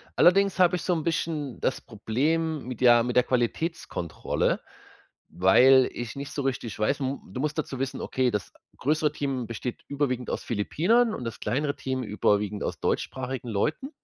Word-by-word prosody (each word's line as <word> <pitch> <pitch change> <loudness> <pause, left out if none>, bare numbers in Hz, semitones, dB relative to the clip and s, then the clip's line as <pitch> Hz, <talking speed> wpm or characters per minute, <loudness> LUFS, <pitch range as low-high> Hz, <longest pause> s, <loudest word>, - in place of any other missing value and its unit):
Allerdings 195 +2 +4
habe 180 0 +5
ich - - -6
so 180 - +1
'n 160 -2 -1
bisschen 155 -4 -2
das - - 0
Problem 150 +8 -1
mit, 125 -2 -6
ja, 120 -2 +6
mit 125 0 -2
der 125 - +6
Qualitätskontrolle, 125 - -1 0.7
weil 130 +8 +5
ich 120 +1 -6
nicht 140 0 -6
so - - -3
richtig 125 -5 -3
weiß 125 +7 +1
m 135 0 -2
du 130 - -4
musst 150 +1 -2
dazu 140 -4 -3
wissen, 135 0 -3
okay, 130 -1 +1
das 105 -3 -3 0.3
größere 150 +2 +1
Team 135 -5 -2
besteht 115 +2 -5
überwiegend 130 -4 -1
aus - - -2
Philippinern 205 - +2
und 125 - -5
das 115 - -5
kleinere 140 +6 -1
Team 130 -1 -3
überwiegend 105 -1 0
aus - - -4
deutschsprachigen 130 -1 -2
Leuten 150 - -1
130 Hz, 170 wpm, -26 LUFS, 120-155 Hz, 0.7 s, ja